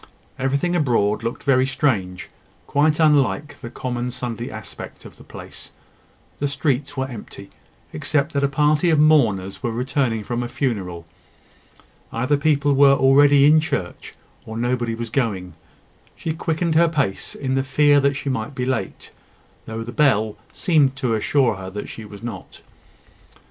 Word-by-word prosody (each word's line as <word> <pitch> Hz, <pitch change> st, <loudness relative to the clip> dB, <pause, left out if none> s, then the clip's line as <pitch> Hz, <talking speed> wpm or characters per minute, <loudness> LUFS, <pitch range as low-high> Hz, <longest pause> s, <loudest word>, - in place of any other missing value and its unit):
Everything 140 Hz, +7 st, 0 dB
abroad 115 Hz, -9 st, +1 dB
looked 115 Hz, +1 st, -4 dB
very 130 Hz, -2 st, +3 dB
strange 100 Hz, -11 st, -1 dB, 0.4 s
quite 150 Hz, +2 st, +2 dB
unlike 150 Hz, -1 st, +2 dB
the 120 Hz, -, -7 dB
common 125 Hz, 0 st, -4 dB
Sunday 120 Hz, -1 st, -5 dB
aspect 110 Hz, -1 st, -10 dB
of -, -, -13 dB
the -, -, -15 dB
place. -, -, -11 dB, 0.7 s
The 145 Hz, -, 0 dB
streets 145 Hz, 0 st, -2 dB
were 130 Hz, 0 st, -1 dB
empty, 105 Hz, -5 st, -10 dB, 0.4 s
except 145 Hz, -, -1 dB
that 140 Hz, -1 st, 0 dB
a -, -, +4 dB
party 150 Hz, +4 st, +2 dB
of 160 Hz, -, +3 dB
mourners 115 Hz, -12 st, +3 dB
were 120 Hz, -, -1 dB
returning 125 Hz, -2 st, -1 dB
from 120 Hz, +3 st, -3 dB
a 120 Hz, -, -4 dB
funeral. 95 Hz, -, -3 dB, 1.1 s
Either 130 Hz, +5 st, +1 dB
people 145 Hz, -1 st, +2 dB
were 140 Hz, 0 st, +6 dB
already 140 Hz, +1 st, +5 dB
all 150 Hz, -, +6 dB
in 155 Hz, -, +6 dB
church, 125 Hz, -, -4 dB, 0.3 s
or 110 Hz, 0 st, -7 dB
nobody 120 Hz, -1 st, -1 dB
was 115 Hz, -1 st, -6 dB
going. 100 Hz, -9 st, -1 dB, 0.6 s
She 160 Hz, -, -3 dB
quickened 165 Hz, +1 st, -1 dB
her 165 Hz, +1 st, +4 dB
pace 140 Hz, -12 st, -2 dB
in 130 Hz, -2 st, -3 dB
the 135 Hz, -, +2 dB
fear 145 Hz, +2 st, +3 dB
that 140 Hz, 0 st, +1 dB
she 140 Hz, -, -6 dB
might 130 Hz, +1 st, -3 dB
be 125 Hz, -1 st, -2 dB
late, 130 Hz, 0 st, -3 dB, 0.6 s
though 110 Hz, 0 st, -5 dB
the 120 Hz, -, -7 dB
bell 110 Hz, -7 st, +2 dB, 0.2 s
seemed 150 Hz, -7 st, +2 dB
to 130 Hz, -3 st, -1 dB
assure 115 Hz, 0 st, +1 dB
her 95 Hz, 0 st, -7 dB
that 105 Hz, +2 st, -7 dB
she 110 Hz, -, -9 dB
was 100 Hz, +1 st, -12 dB
not. 120 Hz, -1 st, -8 dB
130 Hz, 160 wpm, -21 LUFS, 115-145 Hz, 1.1 s, were